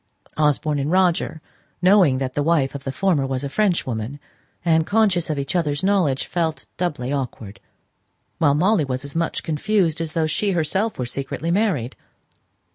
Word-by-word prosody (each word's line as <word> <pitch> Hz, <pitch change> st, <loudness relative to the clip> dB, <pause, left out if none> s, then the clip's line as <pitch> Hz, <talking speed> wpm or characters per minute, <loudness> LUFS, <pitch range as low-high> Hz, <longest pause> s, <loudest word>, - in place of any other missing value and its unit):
Osborne 150 Hz, 0 st, +1 dB
and 140 Hz, +2 st, -1 dB
Roger 175 Hz, -4 st, +1 dB, 0.4 s
knowing 180 Hz, -7 st, +5 dB
that 130 Hz, -1 st, -3 dB
the 145 Hz, -, 0 dB
wife 145 Hz, -3 st, +2 dB
of 140 Hz, -1 st, -8 dB
the 135 Hz, -, -2 dB
former 155 Hz, -3 st, +1 dB
was 135 Hz, 0 st, -3 dB
a 140 Hz, -, -3 dB
Frenchwoman, 140 Hz, -, -1 dB, 0.5 s
and, 160 Hz, -1 st, +3 dB
conscious 200 Hz, -6 st, +2 dB
of 155 Hz, -, -1 dB
each 140 Hz, +4 st, -3 dB
other's 150 Hz, -2 st, 0 dB
knowledge, 185 Hz, -9 st, +2 dB
felt 165 Hz, -3 st, -2 dB
doubly 145 Hz, -7 st, -2 dB
awkward; 115 Hz, -6 st, -5 dB, 0.8 s
while 145 Hz, -4 st, +4 dB
Molly 185 Hz, +3 st, +3 dB
was 130 Hz, 0 st, -3 dB
as 140 Hz, -, -7 dB
much 165 Hz, 0 st, -1 dB
confused 165 Hz, +1 st, 0 dB
as 160 Hz, -2 st, -3 dB
though 165 Hz, -2 st, +1 dB
she 195 Hz, +6 st, 0 dB
herself 190 Hz, +7 st, 0 dB
were 125 Hz, -, -2 dB
secretly 140 Hz, +6 st, -3 dB
married. 175 Hz, -, 0 dB
155 Hz, 165 wpm, -22 LUFS, 135-180 Hz, 0.8 s, knowing